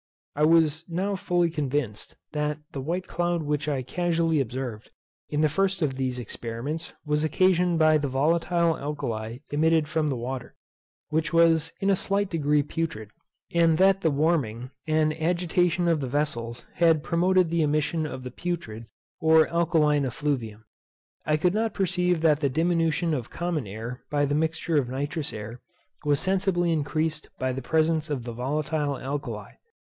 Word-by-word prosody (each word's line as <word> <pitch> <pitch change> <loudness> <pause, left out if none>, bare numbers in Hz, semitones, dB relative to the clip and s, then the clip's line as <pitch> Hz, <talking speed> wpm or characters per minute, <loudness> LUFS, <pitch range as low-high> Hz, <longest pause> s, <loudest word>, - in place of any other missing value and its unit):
I 150 +1 +3
was 160 -1 +4
now 190 +4 -1
fully 175 -2 +1
convinced, 140 -8 -3 0.2
that 150 -1 -1
the 135 - -5
white 175 +6 -2
cloud 175 -2 -1
which 150 0 -1
I 135 -3 -1
casually 165 +1 +1
observed, 125 -3 -4 0.4
in 150 - 0
the 155 - +5
first 190 +3 0
of 140 -3 +1
these 130 -1 -2
experiments, 120 +7 -5
was 150 0 +1
occasioned 180 +2 +3
by 155 -1 +5
the 145 - -1
volatile 165 +4 +2
alkali 115 -6 -4
emitted 160 +1 +3
from 155 0 0
the 140 - 0
water, 125 +1 -5 0.5
which 160 0 0
was 165 -1 +4
in 195 +1 +2
a - - +4
slight 200 +1 -1
degree 150 -3 +2
putrid; 140 -9 -4 0.4
and 165 -2 +4
that 195 +1 +4
the 165 - +3
warming, 140 -6 0 0.2
and 155 0 +2
agitation 175 +1 +1
of 165 -3 +2
the 135 - -2
vessels, 120 -4 -2
had 165 -3 +4
promoted 180 0 +2
the 170 -1 +2
emission 155 +1 +1
of 130 -3 -7
the 125 - -6
putrid, 120 -9 -5 0.3
or 160 -2 +5
alkaline 160 -4 +2
effluvium. 120 -5 -3 0.6
I 155 0 +3
could 175 +3 +2
not 220 +1 0
perceive 180 -3 +1
that 155 -3 +4
the 140 -3 +1
diminution 165 +2 +1
of 125 -5 -3
common 170 -9 -2
air 115 +5 -6
by 145 -1 +2
the 145 - -1
mixture 160 +1 0
of 125 -3 -2
nitrous 145 +3 -2
air 110 +3 -7 0.4
was 145 -2 +2
sensibly 185 -2 +1
increased 155 0 -1
by 130 0 -1
the 135 - -4
presence 160 +2 +1
of 140 -5 -2
the 120 -1 -6
volatile 145 +3 -1
alkali. 140 +2 -5
155 Hz, 165 wpm, -26 LUFS, 135-170 Hz, 0.6 s, the